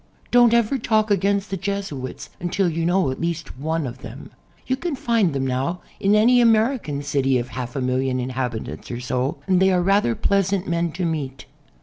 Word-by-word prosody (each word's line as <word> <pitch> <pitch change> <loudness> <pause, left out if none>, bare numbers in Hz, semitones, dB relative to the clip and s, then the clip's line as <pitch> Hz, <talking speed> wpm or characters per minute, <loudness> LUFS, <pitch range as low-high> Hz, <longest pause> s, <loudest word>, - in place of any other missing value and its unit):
Don't 240 -1 +6
ever 235 +3 +2
talk 220 -2 +1
against 200 +1 +1
the 195 - -1
Jesuits 195 -10 -5
until 180 +2 0
you 165 0 -1
know 180 -5 +2
at 130 - -6
least 165 -5 -4
one 160 +1 -1
of 125 0 -6
them. - - -10 0.3
You 260 - 0
can 320 +3 -3
find 230 -8 +1
them 135 -1 -2
now 135 +8 -2 0.2
in 200 +2 +3
any 245 +4 +5
American 225 - +2
city 135 -2 +1
oi - - -1
half 125 0 -6
a 135 - -1
million 130 0 0
inhabitants 125 -2 -4
or 120 - -4
so, 125 +2 -2
and 185 -2 +3
they 190 0 +4
are 180 -1 +2
rather 195 - +2
pleasant 195 -1 +1
men 170 0 0
to 180 0 -2
meet. 145 -5 -3
170 Hz, 195 wpm, -22 LUFS, 130-200 Hz, 0.3 s, Don't